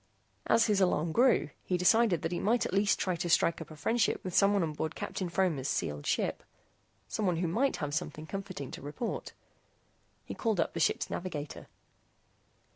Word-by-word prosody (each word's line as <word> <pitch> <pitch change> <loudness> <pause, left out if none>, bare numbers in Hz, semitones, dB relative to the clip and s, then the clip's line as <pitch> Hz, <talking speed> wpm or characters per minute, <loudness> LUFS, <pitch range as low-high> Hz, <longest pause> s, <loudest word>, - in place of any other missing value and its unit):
As 230 - +4
his 210 -3 +2
alarm 170 -3 +2
grew, 235 - +3
he 180 - 0
decided 195 0 +3
that 165 - -1
he 175 - -1
might 230 +4 +2
at - - -4
least 200 0 +3
try 185 -2 -1
to 175 +1 -3
strike 165 0 +3
up - - -8
a 155 - -10
friendship 225 +10 +1
with 185 - -5
someone 200 -1 +4
on 155 -2 -2
board 155 +1 -3
Captain 185 -3 -4
Fromer's 170 -7 0
sealed 75 - -2
ship - - 0 0.7
someone 180 - 0
who 170 +1 -1
might 245 +12 +1
have 150 -2 -3
something 155 0 -3
comforting 185 -6 -6
to - - -8
report. 145 - -5 0.9
He - - -6
called 220 -6 -1
up - - 0
the 165 - -3
ship's - - +1
navigator. 155 -5 -5
180 Hz, 185 wpm, -31 LUFS, 155-205 Hz, 0.9 s, As